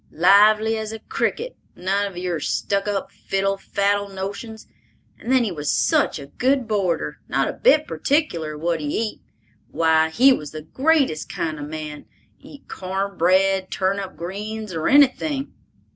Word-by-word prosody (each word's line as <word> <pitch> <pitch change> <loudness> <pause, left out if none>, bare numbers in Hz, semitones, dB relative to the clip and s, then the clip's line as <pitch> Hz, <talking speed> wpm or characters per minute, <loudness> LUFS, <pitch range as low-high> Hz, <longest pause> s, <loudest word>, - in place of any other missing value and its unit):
Lively 215 +5 +4
as 220 0 -5
a 225 - -5
cricket; 475 - -3 0.2
none 195 +3 0
of 190 -3 -10
your 180 -2 -2
stuck 200 +6 -1
up, 200 -1 -2
fiddle 195 0 -1
faddle 200 +1 0
notions. 200 +3 -6 0.5
And 245 - -4
then 260 -2 +4
he 215 - -2
was 150 -3 -2
such - - +2
a 140 - -8
good 255 - 0
boarder—not 195 -6 -1
a - - -3
bit - - +4
particular 170 - -1
what 165 +1 -1
he 150 - -4
eat; 220 -1 -3 0.5
why, 160 -1 +3
he 260 +11 +5
was 150 - -6
the 155 -1 -7
greatest 275 - +1
kind 155 -2 -3
of 145 - -5
a - - -9
man—eat 155 - -10
corn 195 +1 -4
bread, 190 +2 +2
turnip 190 0 -2
greens, 210 +3 -6
or 160 -1 -1
anything!" 285 0 +3
195 Hz, 155 wpm, -22 LUFS, 170-220 Hz, 0.5 s, he